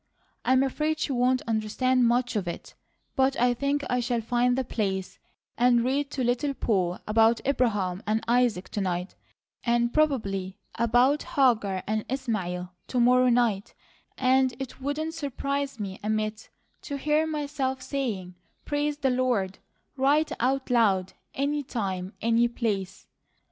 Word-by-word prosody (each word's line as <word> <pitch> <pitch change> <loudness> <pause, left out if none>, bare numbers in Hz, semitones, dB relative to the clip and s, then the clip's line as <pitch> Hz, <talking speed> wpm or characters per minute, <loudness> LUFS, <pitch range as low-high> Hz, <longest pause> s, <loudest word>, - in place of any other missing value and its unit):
I'm 260 +1 +4
afraid 305 +3 0
she - - -1
won't 255 0 +2
understand 235 +3 +1
much 245 0 +1
of 195 -4 -1
it, 170 - -6 0.4
but 265 +1 +2
I 245 +1 +4
think 280 +3 -1
I 250 - +1
shall 240 0 0
find 245 +2 +1
the 265 - +1
place 195 -5 -3 0.4
and 240 -1 +4
read 275 +3 0
to 270 -3 -3
Little 250 +4 0
Poll 185 -8 0
about 225 +2 +4
Abraham 210 -9 0
and 215 +1 +1
Isaac 235 -6 +2
to 205 - -3
night, 180 0 -2 0.5
and 235 0 +1
probably 200 -11 0 0.2
about 245 +5 +3
Hagar 215 -9 +1
and 215 0 -1
Ishmael 185 -9 -3
to 250 - -1
morrow 250 +1 +5
night, 235 -5 +1 0.4
and 260 -1 +3
it 270 0 -7
wouldn't 305 +4 -2
surprise 280 -3 -3
me 195 -2 -5
a 210 - -3
mite 215 0 -2 0.3
to 330 -6 -5
hear 305 +3 +1
myself 285 -4 -2
saying 215 -10 -3 0.3
'Praise 290 0 -1
the 270 -3 +1
Lord,' 245 -7 0 0.4
right 285 +4 +2
out 260 +2 0
loud, 195 -6 +2 0.2
any 290 +2 0
time, 195 -7 -4
any 230 +1 +3
place. 205 -5 -3
245 Hz, 145 wpm, -27 LUFS, 215-270 Hz, 0.5 s, morrow